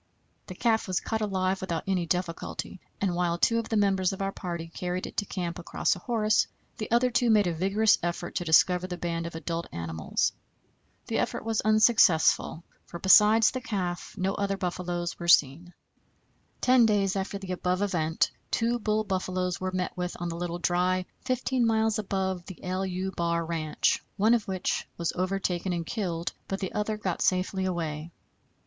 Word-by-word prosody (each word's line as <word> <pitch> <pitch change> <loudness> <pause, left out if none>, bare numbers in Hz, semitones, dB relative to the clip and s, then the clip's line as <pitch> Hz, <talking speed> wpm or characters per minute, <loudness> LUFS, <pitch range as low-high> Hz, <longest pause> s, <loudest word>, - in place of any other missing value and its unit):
The - - -8
calf 225 -3 +1
was 185 -2 0
caught 220 -1 -3
alive 190 -2 0
without 170 -4 -2
any 185 -3 0
difficulty, 175 +1 -3 0.2
and 195 -3 0
while 175 -1 0
two 230 +6 +3
of 230 - -5
the 225 - +1
members 195 -2 +2
of 195 - -6
our 195 0 -1
party 170 -3 -5
carried 180 +2 -3
it - - -9
to 205 - +1
camp 175 -3 -4
across 170 - 0
a - - -9
horse, 215 +1 +2 0.3
the 215 - -4
other 240 +2 +3
two 240 0 +2
made 210 -2 +5
a 175 - 0
vigorous 195 +6 +3
effort 175 0 -3
to - - -2
discover 180 +2 +4
the 180 -1 -5
band 170 -1 -3
of 170 - -8
adult 165 +1 -3
animals. 80 -2 -1 0.7
The - - -1
effort - - -2
was 225 -1 0
unsuccessful, 215 -7 +4 0.2
for, 170 - -7
besides 210 +4 +6
the 255 - -4
calf, 185 -7 -3
no 190 +1 0
other 200 -1 -1
buffaloes 175 -1 -3
were 170 - -5
seen. 170 +2 +4 0.9
Ten 250 -2 +5
days 200 -3 +2
after 195 +1 -2
the 195 -2 -7
above 185 +1 0
event 165 -5 +1 0.2
two 235 +1 +1
bull 215 -1 0
buffaloes 185 -2 -2
were 185 0 -1
met 185 -1 -2
with 180 -1 -4
on 175 0 -3
the 165 - -4
Little 175 0 -3
Dry, 180 +1 +1 0.2
15 255 0 0
miles 220 -1 +2
above 190 -3 -2
the 190 - -9
=LU= 185 0 -2
bar 170 -2 -1
ranch, 160 -2 0
one 215 +3 +4
of 230 -3 +1
which 190 -2 -2
was 170 -1 -1
overtaken 185 0 -1
and 170 -1 -3
killed, 170 -5 -3
but 195 - -3
the 190 - -4
other 210 +1 -1
got 190 -5 -3
safely 185 +1 +1
away. 165 -3 -3
185 Hz, 180 wpm, -28 LUFS, 175-210 Hz, 0.9 s, besides